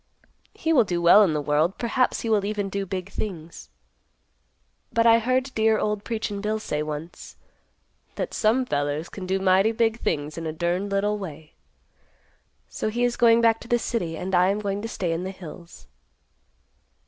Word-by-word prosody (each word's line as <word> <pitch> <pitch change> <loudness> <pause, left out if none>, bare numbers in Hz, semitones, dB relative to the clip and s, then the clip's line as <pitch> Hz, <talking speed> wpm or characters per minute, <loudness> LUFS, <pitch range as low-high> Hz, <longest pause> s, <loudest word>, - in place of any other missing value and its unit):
He 325 0 0
will 255 -6 +6
do 180 -4 -2
well 170 +5 +7
in 185 -7 +3
the 150 - 0
world; 150 +5 +1
perhaps 250 +2 0
he 230 - -3
will 210 -2 +3
even 205 -1 -2
do 195 0 -3
big 190 +1 -5
things. 170 -6 -7 1.2
But 230 0 +2
I 230 0 +6
heard 255 +3 0
dear 220 0 +3
old 210 -1 -1
Preachin' 215 -3 -3
Bill 215 +1 -1
say 150 -8 -3
once, 155 +2 -7 0.8
that - - -4
'some 230 +4 +2
fellers 145 -3 -2
can 185 -2 -8
do 190 +1 +1
mighty 190 +3 +3
big 225 0 0
things 150 -3 -2
in 165 - -5
a 155 - -3
durned 175 +4 -1
little 205 +1 0
way.' 160 -5 -9 1.1
So - - -3
he 240 +3 -1
is 245 -1 +1
going 235 -1 +5
back 225 -1 +3
to - - -12
the 240 - +2
city, 195 -9 -3
and 190 +1 -5
I 180 +1 +4
am 200 - +1
going 200 -1 -3
to 225 - -4
stay 180 -6 -3
in 165 +2 -2
the 190 - -4
hills." 175 -2 -11
200 Hz, 185 wpm, -24 LUFS, 170-225 Hz, 1.2 s, well